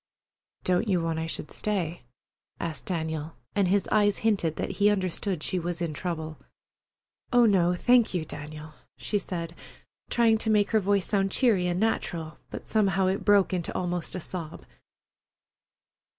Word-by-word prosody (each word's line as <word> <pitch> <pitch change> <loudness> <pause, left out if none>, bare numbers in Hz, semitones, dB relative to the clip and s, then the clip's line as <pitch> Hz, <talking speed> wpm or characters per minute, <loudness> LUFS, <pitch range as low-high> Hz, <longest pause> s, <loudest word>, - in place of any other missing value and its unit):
"Don't 180 +4 +1
you 185 -4 +2
want 165 -1 -1
I 160 - -2
should 155 - -5
stay?" 180 -6 -2 0.6
asked 165 -2 -4
Daniel, 160 -3 -3 0.2
and 200 -2 +3
his 195 +2 +2
eyes 205 -1 +3
hinted 190 -8 +2
that - - -3
he 205 - +6
understood 185 -3 -1
she 185 - 0
was 175 0 -3
in 170 -3 -2
trouble. 160 -2 -4 0.9
"Oh, 245 -1 +6
no, 180 -4 +3
thank 245 +4 +4
you, 175 -4 -2
Daniel," 150 +1 -8 0.2
she 205 - -1
said, 170 -3 -4 0.6
trying 225 -2 +3
to 220 - 0
make 210 -2 +3
her 220 - +4
voice 200 -1 +1
sound 195 -2 +1
cheery 205 -8 +3
and 175 0 0
natural, 170 -7 -1
but - - -8
somehow 195 -3 +2
it 190 +1 0
broke 205 -2 +4
into 175 -3 -2
almost 175 -1 -2
a - - -2
sob. 170 -2 -5
185 Hz, 160 wpm, -27 LUFS, 165-205 Hz, 0.9 s, he